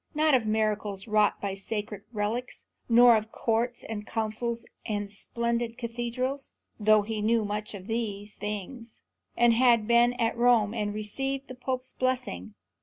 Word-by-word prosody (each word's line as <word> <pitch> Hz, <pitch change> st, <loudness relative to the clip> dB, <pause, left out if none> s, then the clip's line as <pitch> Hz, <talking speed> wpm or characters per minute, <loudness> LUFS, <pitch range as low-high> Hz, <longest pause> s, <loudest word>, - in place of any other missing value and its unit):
Not 310 Hz, 0 st, +3 dB
of 240 Hz, -4 st, +3 dB
miracles 215 Hz, -2 st, -1 dB
wrought 210 Hz, -1 st, +3 dB
by 200 Hz, -1 st, -3 dB
sacred 210 Hz, +1 st, -4 dB
relics; 225 Hz, +3 st, -3 dB, 0.2 s
nor 240 Hz, 0 st, +8 dB
of 215 Hz, 0 st, -2 dB
courts 235 Hz, +2 st, -1 dB
and 215 Hz, -2 st, -5 dB
councils 230 Hz, +1 st, -2 dB, 0.2 s
and 205 Hz, -2 st, -3 dB
splendid 235 Hz, +2 st, -2 dB
cathedrals; 240 Hz, +3 st, -3 dB, 0.3 s
though 215 Hz, 0 st, +5 dB
he 215 Hz, 0 st, -3 dB
knew 225 Hz, 0 st, +2 dB
much 210 Hz, +1 st, -3 dB
of 190 Hz, -2 st, -9 dB
these 210 Hz, -2 st, -3 dB
things, 210 Hz, +3 st, -6 dB, 0.4 s
and 240 Hz, -1 st, +5 dB
had 235 Hz, -2 st, +4 dB
been 240 Hz, +1 st, +5 dB
at 230 Hz, -2 st, 0 dB
Rome 235 Hz, -3 st, +4 dB
and 210 Hz, -3 st, -1 dB
received 270 Hz, +6 st, -3 dB
the -, -, -6 dB
Pope's 255 Hz, 0 st, -3 dB
blessing. 110 Hz, -, -2 dB
225 Hz, 150 wpm, -28 LUFS, 210-240 Hz, 0.4 s, nor